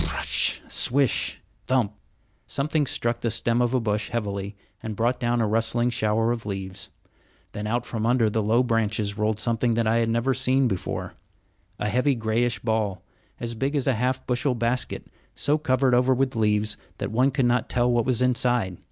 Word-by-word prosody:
Pr - - -2
r 75 - -1
r - - -4
r - - -1
ush, - - +1
swish! 135 0 +1 0.3
thump! 125 -6 +1 0.5
Something 150 +1 0
struck 120 -1 -1
the 115 - 0
stem 115 +2 +1
of 120 +1 +1
a - - +3
bush 105 -2 -1
heavily 100 -3 -3 0.3
and 110 -1 -5
brought 120 +4 0
down 120 0 0
a 110 - +2
rustling 115 +3 +1
shower 115 0 +1
of 120 -2 -3
leaves; 95 -1 -5 0.6
then 105 +1 -5
out 120 +2 -1
from 115 -1 -2
under 120 -2 +3
the 110 +1 0
low 115 +4 +3
branches 110 -3 0
rolled 105 0 0
something 115 +1 +1
that 115 0 +1
I 110 +1 +2
had 115 -1 +1
never 115 +4 +1
seen 130 0 +2
before, 95 -5 -3 0.6
a 105 - -2
heavy, 125 +5 +2
grayish 115 0 0
ball, 110 -5 -1 0.4
as 115 0 -4
big 135 +6 -2
as 140 - 0
a 135 - +3
half 125 +3 -1
bushel 125 +1 0
basket, 120 +2 -1 0.3
so 150 +2 +1
covered 130 -3 +2
over 125 +1 +4
with 130 0 0
leaves 105 -1 +1 0.2
that - - -4
one 125 +4 +3
could 135 -1 0
not 120 +1 +1
tell 125 0 +2
what 120 -1 +2
was 125 -1 +2
inside. 120 -7 +1
115 Hz, 195 wpm, -25 LUFS, 110-125 Hz, 0.6 s, over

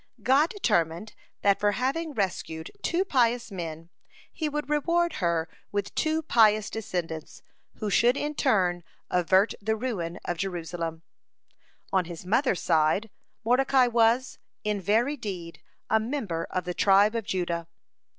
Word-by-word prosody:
God 275 +7 +4
determined, 205 - 0 0.3
that 200 -1 +4
for 205 0 +2
having 290 +7 -1
rescued 165 -5 -3
two 360 +3 0
pious 245 - +1
men 165 -2 -6 0.4
He 315 -2 -2
would 295 0 -3
reward 335 +3 +1
her 170 -2 +1 0.2
with 205 0 -2
two 315 +1 0
pious 215 -6 +4
descendants, 175 -7 -5 0.3
who 210 -2 -3
should 240 +6 +4
in 295 +1 -2
turn 185 - +1 0.3
avert 185 +4 +3
the 220 +2 0
ruin 205 -8 -3
of 175 - -2
Israel. 175 -3 -4
(58) 165 -2 -4 0.9
On 190 -2 +3
his 170 +1 -8
mother's 220 0 +1
side, 165 +6 +2 0.3
Mordecai 255 +2 +4
was, 240 +1 +2 0.2
in 210 -1 -1
very 230 - +1
deed, 180 -8 -6 0.3
a 220 - +3
member 220 - -3
of 185 - -2
the 180 0 -3
tribe 200 +3 +4
of 230 -1 -2
Judah. 175 -4 -2
210 Hz, 140 wpm, -27 LUFS, 175-250 Hz, 0.9 s, God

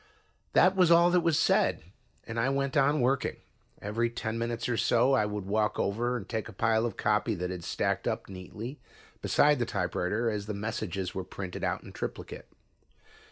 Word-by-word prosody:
That 185 +1 +5
was 180 -3 +4
all 170 +1 +6
that 180 - +4
was 165 -3 +2
said, - - +2 0.4
and 115 +1 -4
I 120 +4 +2
went 140 0 -1
on 145 0 +3
working. 130 +2 +1 0.5
Every 115 +3 0
ten 110 -1 -4
minutes 115 0 -2
or 120 - 0
so 120 +4 +3
I 105 -6 +3
would 105 -2 -4
walk 105 +2 0
over 120 +5 0
and 105 -4 -8
take 110 0 -3
a - - -10
pile 110 +3 +2
of 110 - -7
copy 105 +1 +1
that 90 0 -3
had 90 -2 -6
stacked - - -1
up - - -2
neatly 105 +8 -8 0.4
beside 150 -1 +3
the 120 - +1
typewriter 100 +4 -1
as 105 -1 -4
the 105 - -3
messages 100 -3 -3
were 95 -2 -3
printed 95 0 -7
out - - -1
in - - -11
triplicate. - - -6
110 Hz, 190 wpm, -29 LUFS, 100-130 Hz, 0.5 s, all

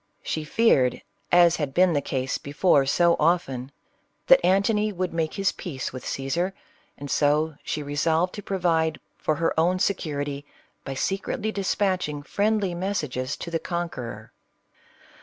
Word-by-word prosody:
<5he 155 -1 -3
feared, 145 - +3 0.3
as 175 -1 +6
had 145 -4 -3
been 180 -1 +4
the 145 - +1
case 130 -1 -2
before 140 -1 +2
so 170 +4 +4
often, 140 -6 0 0.5
that - - +7
«A.ntony 210 +3 +2
would 185 -2 -3
make 160 -2 -1
his 195 -1 +1
peace 135 -9 -6
with 130 - -7
Caesar; 170 +8 -2 0.4
and 145 0 -7
so, 150 +2 +2
'she 150 - -3
resolved 160 +5 +1
to 205 - -6
provide 165 -5 0 0.2
for 155 - 0
her 165 +1 0
own 175 +3 +3
security, 145 -7 -2 0.4
by 135 - -5
se 195 +8 -1
cretly 215 +2 -3
dispatching 185 -6 -1
friendly 205 +2 0
messages 150 -8 -2
to 170 - -7
the 165 - 0
conqueror. 125 - -5
165 Hz, 145 wpm, -25 LUFS, 145-185 Hz, 0.5 s, that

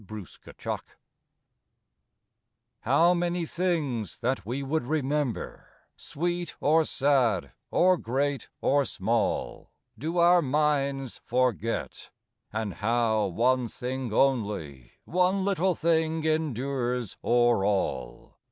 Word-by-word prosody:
UNFORGOTTEN 105 -4 -8
I - - -5 2.0
How 165 +8 +4
many 175 0 -1
things, 155 - -1
that 130 -1 0
we 130 +4 -2
would 155 +4 0
remember, 145 -3 -2 0.3
Sweet 175 +2 -3
or 160 +2 +4
sad, 130 -11 +1 0.2
or 185 +1 +4
great 140 +2 -2
or 140 +1 +3
small, 115 -1 -1 0.3
Do 160 +9 -4
our 175 +1 +6
minds 140 -2 0
forget! 120 -3 -1 0.4
and 110 -2 -3
how 110 0 +1
one 125 +6 +1
thing 125 +1 -4
only, 100 - 0
One 185 +2 +1
little 190 -2 +1
thing 160 -1 +1
endures 130 - -1
o'er 120 -4 +3
all! 70 -12 -2
135 Hz, 100 wpm, -27 LUFS, 115-160 Hz, 2.0 s, our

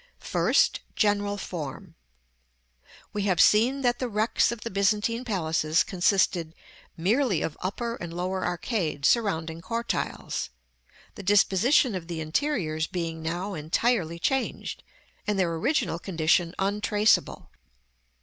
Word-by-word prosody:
§ - - -30
VI. - - -29 0.2
First. - - +2 0.2
General 205 -1 +1
Form. 160 -8 -6 1.2
We 205 -1 -1
have 185 -4 +1
seen 240 +9 +4
that 245 -2 +1
the 255 - -2
wrecks 215 +2 +2
of 235 -2 -6
the 230 - -5
Byzantine 210 +5 +1
palaces 160 -7 +1
consisted 175 -3 +1 0.4
merely 205 - +1
of 155 - -3
upper 230 +5 -3
and 175 -1 -7
lower 185 +2 -2
arcades 175 - -1
surrounding 165 -8 0
cortiles; 230 - -3 0.6
the - - -9
disposition 205 +6 +3
of 180 -3 -5
the 170 -2 -4
interiors 160 - -1
being 165 -2 -4
now 175 +5 -3
entirely 170 +2 0
changed, 265 +10 -2 0.5
and 210 -1 0
their 175 -3 +1
original 205 - 0
condition 170 -1 +1
untraceable. 210 +2 +1
190 Hz, 125 wpm, -26 LUFS, 165-220 Hz, 1.2 s, seen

